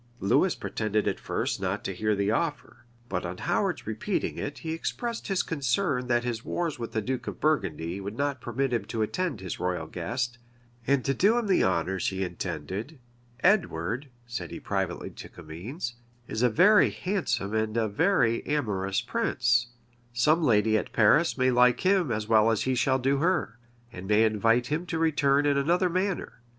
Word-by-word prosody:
Lewis 95 - +2
pretended 110 -1 -1
at - - -1
first - - -2
not 95 +2 -2
to 95 - -3
hear 105 +3 0
the 100 +1 0
offer; 145 -2 -3 0.2
but 90 -4 -2
on 90 +1 -5
Howard's - - -1
repeating - - -2
it, - - -5
he 160 - -5
expressed 230 +8 -3
his 195 -2 +1
concern 140 -2 0
that 120 -1 +2
his 120 -2 -3
wars 165 -6 -2
with 115 - -5
the 110 - -1
duke 130 +3 -3
of - - -5
Burgundy 95 - -1
would 100 +3 -6
not 140 -3 -1
permit 125 +2 -1
him 115 -4 0
to 110 0 -2
attend 170 - -2
his 90 -3 -5
royal 90 0 -1
guest, 120 0 -3 0.5
and 140 -1 +2
do 200 - +3
him 240 - 0
the 195 -3 +3
honors 95 0 0
he 95 0 -1
intended 100 - -5 0.4
"Edward," 135 - +1 0.2
said 120 0 -5
he - - -7
privately 95 -3 -3
to - - -10
Comines, 95 - -7 0.3
"is 110 - -3
a 125 - +4
very 185 - +5
handsome 125 - -2
and 110 0 0
a 115 -1 +2
very 125 - +2
amorous 100 -10 0
prince: 115 +2 +1 0.5
some 150 +8 +3
lady 110 -4 +3
at - - -7
Paris 140 +11 +4
may 130 0 +3
like 125 0 +4
him 185 -7 +2
as 105 -1 -2
well 110 0 +5
as 110 -2 +1
he 130 - 0
shall 130 +1 +2
do 135 +2 +1
her; 160 -7 0 0.3
and 90 +2 -8
may 105 +2 +4
invite 115 +2 +2
him 155 +7 -2
to 165 - -2
return 145 -3 +2
in 140 -1 +3
another 175 +6 +2
manner. 185 -8 -2
120 Hz, 180 wpm, -27 LUFS, 105-150 Hz, 0.5 s, very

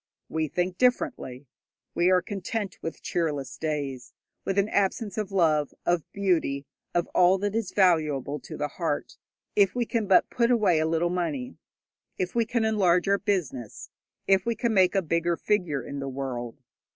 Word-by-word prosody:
We 160 -1 -1
think 180 +4 -2
differently. 145 - 0 0.5
We 175 +1 +3
are 185 -1 +4
content 200 0 -4
with 165 - -6
cheerless 150 -6 -2
days, 140 -5 -3 0.3
with 195 - -2
an 200 +1 +3
absence 205 0 0
of 210 -3 -3
love, 155 -6 +2
of 175 -2 0
beauty, 165 -8 0 0.3
of 175 - +2
all 180 +1 +5
that 205 +1 -2
is 225 -3 -2
valuable 155 -7 +2
to - - -9
the 150 - -1
heart, 145 0 -3 0.4
if 200 0 +4
we 245 -1 +1
can 225 -3 -1
but 190 - +4
put 235 -1 +2
away 215 -9 +3
a 160 - +1
little 165 +2 +1
money, 150 - -3 0.6
if 185 -1 -2
we 235 -1 +2
can 230 -1 0
enlarge 190 -5 +3
our 200 0 +3
business, 155 - -3 0.3
if 195 -1 +4
we 235 +1 -1
can 235 0 0
make 190 -1 +4
a 195 - +2
bigger 170 +1 0
figure 180 - 0
in 140 +2 -6
the 135 0 -4
world. 130 -3 -5
180 Hz, 175 wpm, -27 LUFS, 150-200 Hz, 0.6 s, all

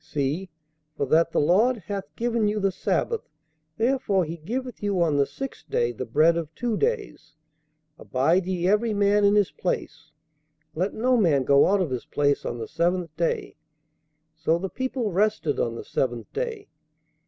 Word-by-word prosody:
See, 150 +6 -2 0.5
for - - 0
that 160 +5 +3
the - - +1
Lord 215 +11 +3
hath 190 -5 -6
given 230 -2 0
you 210 +1 0
the 195 -1 +1
sabbath, 450 - -1 0.5
therefore 225 -6 +1
he 165 +2 -6
giveth 245 +9 -5
you 200 -3 0
on 165 -4 +2
the 140 -1 +2
sixth 270 -1 -8
day 120 0 +1
the 120 +2 -6
bread 155 +8 +4
of 160 -2 -4
two 240 -2 -1
days; 420 - -2 0.6
abide 165 +8 +1
ye 180 -1 0
every 210 +2 +2
man 205 0 +3
in 200 0 +5
his 205 -2 +3
place, 160 -3 -4 0.6
let 185 +5 -2
no 250 +3 +2
man 160 - +3
go 140 +2 +5
out 200 0 +3
of 165 -7 -1
his 125 - -3
place 145 -1 +1
on 120 - -3
the 115 - -5
seventh 170 -1 -1
day. 170 0 -2 0.8
So 160 +1 +1
the 190 +2 -4
people 260 -3 -2
rested 195 -5 +1
on 115 -1 -1
the - - -7
seventh 120 -3 -2
day.' 450 -4 -4
185 Hz, 175 wpm, -25 LUFS, 155-215 Hz, 0.8 s, in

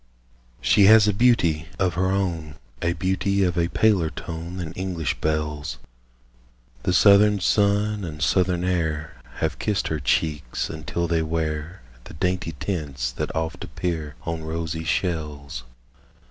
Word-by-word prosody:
She 100 - +5
has 110 +1 +8
a 105 - +3
beauty 90 -9 +3
of 95 -2 +1
her 90 +2 +1
own, 85 -6 -1 0.3
A 85 - +1
beauty 95 +3 0
of 90 -2 +1
a 85 -1 +2
paler 95 -5 +2
tone 85 +3 -7
Than 85 -4 -5
English 90 -5 -3
belles; 75 -3 -2 1.1
Yet 90 - +1
southern 100 +1 +6
sun 105 +1 +2
and 75 -4 -6
southern 90 +5 +2
air 80 -4 -2
Have - - -2
kissed 105 -2 0
her 80 - -1
cheeks, 75 -1 -1
until 80 +2 -3
they 85 -1 +1
wear 80 -1 -3 0.2
The - - -11
dainty 90 0 -1
tints 70 -10 -3
that - - -4
oft 80 +3 -3
appear 80 -3 -4
On 85 -1 -3
rosy 80 0 -4
shells. 75 -7 -2
85 Hz, 140 wpm, -24 LUFS, 75-95 Hz, 1.1 s, has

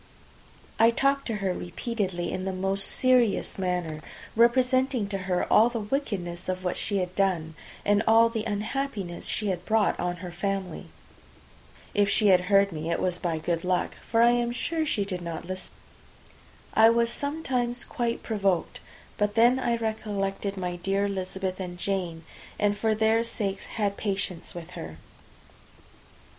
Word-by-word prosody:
I 225 - +7
talked 275 +3 +1
to 225 - -1
her 185 - +1
repeatedly 185 -1 -3
in 185 - -3
the 190 - -1
most 195 +1 0
serious 250 -6 +2
manner, 180 -4 -2 0.3
representing 250 0 +3
to 195 -1 -2
her 180 -1 +1 0.2
the 235 -1 -3
wickedness 200 -8 -3
of 185 0 -2
what 180 - -1
she 200 - -1
had 180 -1 -2
done, 180 -5 0 0.3
and 205 0 +4
all 225 +1 +7
the 230 -2 -3
unhappiness 210 -3 -3
she 210 -2 -1
had 180 -2 -2
brought 220 -1 +2
on 175 0 -1
her 175 - -6
family. 195 +1 -3 1.1
If 205 -1 +3
she 210 0 +3
heard 195 +2 +4
me, 160 0 -4
it 170 - 0
was 180 -1 -1
by 170 -2 -1
good 165 +1 -2
luck, 180 -1 0
for 230 0 +2
I 240 - +6
am 240 0 +1
sure 315 +6 -1
she 205 -7 +1
did 185 -3 -3
not 170 -1 -5
listen. 185 +1 -6 1.0
I 220 +1 +7
was 235 0 +3
sometimes 260 -5 -2
quite 235 -2 -2
provoked; 195 -6 0 0.4
but 205 0 +1
then 240 +3 +5
I 240 -2 +1
recollected 205 -3 -2
my 180 -1 -3
dear 195 +3 0
Elizabeth 190 -1 -3
and 180 -1 -5
Jane, 175 -3 -2 0.3
and 205 0 +2
for 220 +1 +1
their 220 +1 +3
sakes 205 -4 -3
had 205 -3 -2
patience 190 -5 -3
with 175 0 -8
her. 80 - -8
200 Hz, 155 wpm, -27 LUFS, 180-230 Hz, 1.1 s, I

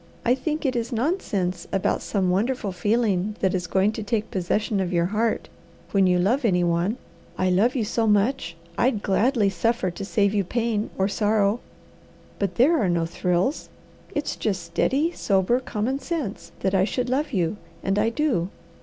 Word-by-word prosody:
I 245 - +5
think 305 +4 -2
it 260 -2 +1
is 235 +1 -2
nonsense 215 - -1
about 195 - 0
some 190 -3 0
wonderful 210 +2 0
feeling 210 0 0
that 190 - +1
is 180 -1 -1
going 195 +2 +2
to 220 - -5
take 215 +1 -2
possession 200 +3 0
of 185 -1 -1
your 170 -1 +2
heart 220 +4 0 0.4
when 195 -2 +4
you 180 0 +3
love 225 +10 +2
any 180 -6 +3
one. 175 +6 +1 0.4
I 185 0 +2
love 220 +8 +3
you 245 - +1
so 225 +1 0
much 210 -4 +1 0.2
I'd 235 -5 +2
gladly 220 +2 +2
suffer 195 +1 0
to 175 +3 -7
save 200 0 +1
you 205 -2 +2
pain 225 +1 -1
or 190 - +2
sorrow. 210 +1 +1 0.8
But 195 -3 -1
there 300 +7 +4
are 195 - +2
no 170 -1 +1
thrills; 180 - -1 0.5
it's 290 0 -1
just 190 -5 -2
steady, 270 - +1
sober, 200 - +1
common 255 +2 -2
sense 280 - -4
that 190 0 0
I 190 -1 +4
should 245 +5 -1
love 280 +5 0
you, 180 -3 0 0.3
and 195 +1 +1
I 220 +2 +3
do. 230 - 0
210 Hz, 180 wpm, -24 LUFS, 185-240 Hz, 0.8 s, I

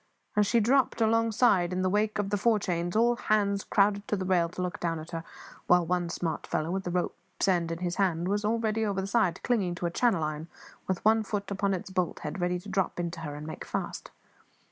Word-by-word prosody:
As 210 -1 +3
she 235 - +3
dropped 250 +4 +2
alongside, 225 -4 +3
in 185 0 -1
the - - +2
wake 210 +2 +1
of 205 -1 -2
the 205 - +2
fore 220 +2 +3
chains, 175 -2 -2
all 235 +2 +3
hands 200 -4 +1
crowded 200 0 +2
to - - 0
the 190 -2 -3
rail 175 -2 +2
to 180 - -6
look 180 -1 -4
down 165 -1 -1
into 160 +2 -6
her; 165 - -6 0.4
while 180 -1 +5
one 175 0 0
smart 170 -1 -3
fellow, 155 +2 -1
with 190 0 -2
a - - 0
rope's 180 +1 -2
end 175 -3 +2
in 165 - -2
his 175 0 -3
hand, 175 -3 +1
was 205 +2 0
already 225 0 0
over 200 -3 0
the 190 - -2
side, 195 -4 +1
clinging 200 -8 +1
to 175 - -4
a 170 - 0
channel 195 -4 +2
iron, 155 +1 -3 0.4
with 190 0 -2
one 220 +1 +5
foot 205 -1 -4
upon 200 0 +1
its 185 +1 -7
bolt 185 -2 -1
head, 190 - -5
ready 180 0 +1
to 180 - -11
drop 190 -3 -1
into 170 -1 -3
her 150 -3 -5
and 150 +1 -7
make 155 - -6
fast. - - -4
190 Hz, 235 wpm, -29 LUFS, 175-210 Hz, 0.4 s, while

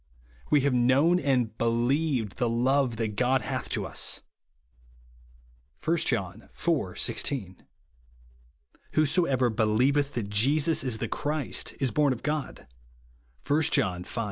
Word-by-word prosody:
"We 145 - +4
have 140 0 +1
known 135 +8 +3
and 125 -8 0
believed 120 0 0
the 120 - 0
love 125 +1 +1
that 110 -2 -3
God 125 +1 +1
hath - - -4
to - - -2
us," - - 0 1.6
(1 170 +1 +2
John 110 - -2
iv. 150 - -1
16). 100 -10 -1 1.3
"Whosoever 140 -5 +2
believeth 125 +7 +1
that 105 -4 -4
Jesus 145 +10 +3
is 125 -4 0
the - - -3
Christ, 150 0 -2
is 135 -4 +2
born 145 +3 +2
of 120 - -10
God," 150 -1 -4 0.8
(I 150 +2 +2
John 90 - +1
v. 115 - -6
130 Hz, 125 wpm, -27 LUFS, 115-145 Hz, 1.6 s, We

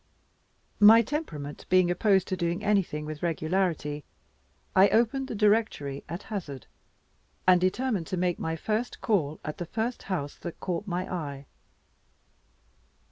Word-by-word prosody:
My 220 +2 +8
temperament 165 - -5
being 185 -1 +4
opposed 190 0 +2
to 190 - 0
doing 170 -1 -2
anything 190 -7 +1
with 155 -1 -6
regularity, 160 -3 -1 0.7
I 190 +2 +7
opened 240 +4 +2
the - - -5
directory 205 -10 +1
at 170 +5 -5
hazard, 145 - -6 0.8
and 180 -1 +6
determined 195 -1 0
to 185 - -3
make 175 -1 0
my 160 0 -2
first 220 +8 -2
call 155 -9 0
at 150 - -5
the 175 - -3
first 230 +6 -2
house 145 -7 -3
that 170 - -8
caught 185 +3 -3
my 180 0 -2
eye. 140 -5 -5
180 Hz, 135 wpm, -28 LUFS, 155-210 Hz, 0.8 s, My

